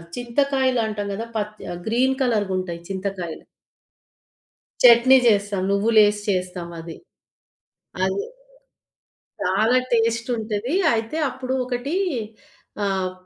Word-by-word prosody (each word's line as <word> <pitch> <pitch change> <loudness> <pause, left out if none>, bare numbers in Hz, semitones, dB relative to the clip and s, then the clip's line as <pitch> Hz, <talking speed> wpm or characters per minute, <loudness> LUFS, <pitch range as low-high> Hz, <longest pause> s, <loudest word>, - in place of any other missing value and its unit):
చింతకాయలంటాం 245 -4 0
గదా! 225 +3 -5
పచ్చ 210 0 -3 0.2
ఆహ్, 175 - -7
గ్రీన్ 255 +4 +2
కలర్‌గుంటాయి 190 -7 -1
చింతకాయలు. 190 -3 -5 1.4
చట్నీ 245 +2 +8
జేస్తాం. 205 -3 +2
నువ్వులేసి 210 0 +4
చేస్తాం 180 -2 -2
అది. 165 0 -8 1.1
అది 400 - -1 1.2
చాలా 230 +4 +2 0.2
టేస్ట్ 230 +1 +1
ఉంటది. 220 +5 -3 0.2
అయితే 225 +7 -2
అప్పుడు 260 0 -5
ఒకటి 255 +6 -3 0.9
ఆహ్, 190 -2 -1
220 Hz, 90 wpm, -22 LUFS, 195-245 Hz, 1.4 s, చట్నీ